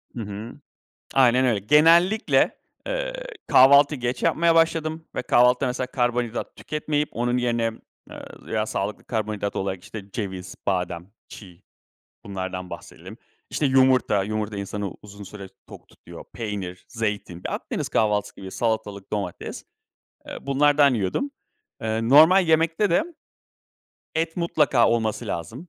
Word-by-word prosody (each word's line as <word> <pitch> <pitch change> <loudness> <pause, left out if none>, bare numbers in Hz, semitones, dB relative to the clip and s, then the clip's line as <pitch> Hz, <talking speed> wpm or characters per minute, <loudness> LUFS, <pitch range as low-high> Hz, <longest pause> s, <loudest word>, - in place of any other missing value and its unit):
Hı 120 - -4
hı. 105 +3 -7 0.6
Aynen 130 -1 +4
öyle. 115 -4 +2
Genellikle, 165 - +4 0.3
ııı, - - -2 0.3
kahvaltıyı 140 +1 +6
geç 120 +1 -2
yapmaya 165 0 +3
başladım. 160 -1 +1
Ve - - -2
kahvaltıda, 125 +2 +3
mesela, 125 +1 -2
karbonhidrat 120 -2 -2
tüketmeyip 150 -1 -2
onun 120 +1 0
yerine, 120 -2 0 0.4
ııı, - - -12
veya 110 -1 -1
sağlıklı 100 +1 -4
karbonhidrat 105 -3 -3
olarak, 95 -1 -3
işte, 100 -2 -9
ceviz, 95 -4 -5
badem, 90 -1 -2 0.2
çiğ, 90 -3 -13 0.6
bunlardan 95 -2 -5
bahsedelim. - - -10 0.3
İşte, 145 - 0
yumurta. 130 -6 +3
Yumurta, 105 0 -3
insanı 100 0 -4
uzun 100 0 -11
süre 100 -1 -9 0.2
tok - - -13
tutuyor. - - -13
Peynir, 100 -6 -5
zeytin. 105 -6 -4
Ya, - - -4
Akdeniz - - -4
kahvaltısı 105 -2 0
gibi 95 -1 -9
salatalık, 110 -3 -3
domates. 100 -4 -5 0.7
Iıı, - - -9
bunlardan 145 0 +4
yiyordum. 120 - -1 0.5
Iıı, 110 +1 -1
normal 160 +7 +7
yemekte 165 +5 +2
de, 305 - +3 1.1
et 165 0 -1
mutlaka 150 -8 +2
olması 115 0 -1
lazım. 110 - -6
115 Hz, 130 wpm, -24 LUFS, 100-145 Hz, 1.1 s, normal